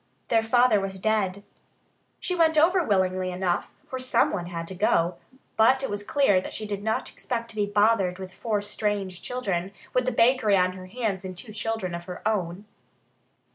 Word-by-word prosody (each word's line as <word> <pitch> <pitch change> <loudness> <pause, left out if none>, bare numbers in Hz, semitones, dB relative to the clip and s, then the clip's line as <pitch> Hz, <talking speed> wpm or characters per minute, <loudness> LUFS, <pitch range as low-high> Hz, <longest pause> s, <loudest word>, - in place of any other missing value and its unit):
Their 225 -1 +4
father 240 -1 +4
was 190 -1 -5
dead. 200 -2 0 0.8
She 365 - -2
went 325 -3 +3
over 350 +4 +5
willingly 185 - +1
enough, 180 -1 -1 0.2
for 260 - -5
someone 205 -7 +1
had 170 -1 -5
to - - -5
go. 175 -2 +1 0.4
But 260 +5 +5
it 270 - -2
was 205 0 -2
clear 205 -5 +3
that - - -7
she 215 - -4
did 205 -1 -4
not 220 +1 -1
expect 235 -2 -4
to - - -12
be 205 -1 0
bothered 205 -3 +2
with 190 -1 -8
four 210 -1 -2
strange 205 -3 -2
children, 195 -7 -2 0.2
with 250 0 +2
the - - +2
bakery 230 -3 +4
on 185 0 +3
her 185 0 -10
hands 205 -3 -2
and 185 -1 -7
two 215 +4 -9
children 220 -4 -2
of 170 0 -5
her 180 +3 -5
own. 190 -2 -2
205 Hz, 185 wpm, -26 LUFS, 185-230 Hz, 0.8 s, over